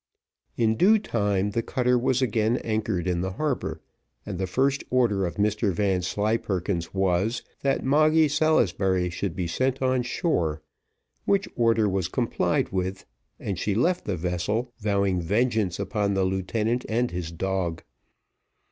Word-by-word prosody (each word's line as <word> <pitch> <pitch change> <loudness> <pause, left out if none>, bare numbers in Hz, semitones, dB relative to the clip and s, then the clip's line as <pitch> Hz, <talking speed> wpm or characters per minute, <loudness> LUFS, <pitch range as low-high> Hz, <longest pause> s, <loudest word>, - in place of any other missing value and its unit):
In 110 -1 +2
due 210 - +6
time 105 - 0
the 115 - 0
cutter 125 +1 +1
was 130 +1 +1
again 115 0 +1
anchored 110 -5 -1
in 90 -1 0
the 95 0 -3
harbour, 100 - -2 0.4
and 95 -4 -5
the 95 - -1
first 135 +8 +1
order 110 -7 +2
of 85 - -6
Mr 105 0 +1
Vanslyperken's 95 -1 -1
was, 95 +4 0 0.2
that 135 -1 0
Moggy 155 +3 +4
Salisbury 100 - +2
should 90 0 -3
be 90 - -2
sent 130 +9 0
on 130 -1 +1
shore, 85 - -1 0.6
which 200 -1 +2
order 115 -2 +3
was 95 -2 0
complied - - 0
with, 95 0 -3 0.3
and 95 -4 -4
she 100 0 -1
left 175 - +1
the 100 -4 -2
vessel, 90 +8 -2
vowing 100 -4 +1
vengeance 105 0 +1
upon 100 -3 -1
the 95 - +2
lieutenant 105 +6 -1
and 120 +2 0
his 85 -2 -4
dog. 85 -1 -2
105 Hz, 145 wpm, -25 LUFS, 95-125 Hz, 0.6 s, due